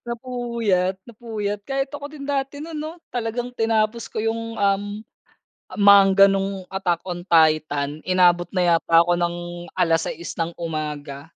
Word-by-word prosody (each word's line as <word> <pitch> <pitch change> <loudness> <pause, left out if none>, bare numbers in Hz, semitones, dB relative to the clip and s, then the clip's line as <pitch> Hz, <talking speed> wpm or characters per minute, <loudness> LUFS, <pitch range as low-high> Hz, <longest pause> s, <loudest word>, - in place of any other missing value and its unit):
Napuyat, 235 -6 -1
napuyat. 215 -3 -5
Kahit 270 +1 -2
ako 290 0 -6
din 295 -2 -9
dati 280 0 -2
nun 325 0 -7
'no. 310 +1 -5 0.2
Talagang 245 +1 -3
tinapos 225 -1 0
ko - - -15
yung, 230 0 -3
um, 200 0 +1 0.9
manga 200 -1 +7
nung 195 -1 -1
Attack 180 -3 -2
on 175 -1 -5
Titan, 155 -2 +2
inabot 175 -1 +3
na 180 -2 +2
yata 165 0 +4
ako 175 - +2
ng 175 0 0 0.4
6:00 165 0 0
ng 165 0 -2
umaga. 150 -4 -5
195 Hz, 135 wpm, -22 LUFS, 170-235 Hz, 0.9 s, manga